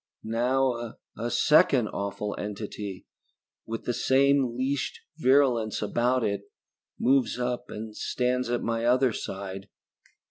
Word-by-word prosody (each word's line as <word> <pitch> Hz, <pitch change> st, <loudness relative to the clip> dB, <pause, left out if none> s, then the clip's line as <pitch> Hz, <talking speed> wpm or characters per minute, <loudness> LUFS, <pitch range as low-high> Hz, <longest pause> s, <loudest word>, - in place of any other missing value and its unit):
Now 120 Hz, +1 st, 0 dB, 0.2 s
a 120 Hz, +2 st, -3 dB
second 140 Hz, -5 st, +4 dB
awful 100 Hz, +1 st, -3 dB
entity, 105 Hz, -2 st, -6 dB, 0.6 s
with 115 Hz, 0 st, -4 dB
the 120 Hz, -, -1 dB
same 135 Hz, -1 st, +3 dB
leashed 135 Hz, +1 st, -1 dB, 0.2 s
virulence 130 Hz, -6 st, +3 dB
about 120 Hz, +4 st, +1 dB
it, 100 Hz, -1 st, -1 dB, 0.5 s
moves 130 Hz, -1 st, +2 dB
up 125 Hz, 0 st, -2 dB
and 110 Hz, 0 st, -7 dB
stands 125 Hz, +1 st, -1 dB
at 120 Hz, 0 st, -1 dB
my 115 Hz, 0 st, -1 dB
other 125 Hz, 0 st, +3 dB
side. 95 Hz, 0 st, -6 dB
120 Hz, 115 wpm, -27 LUFS, 105-130 Hz, 0.6 s, second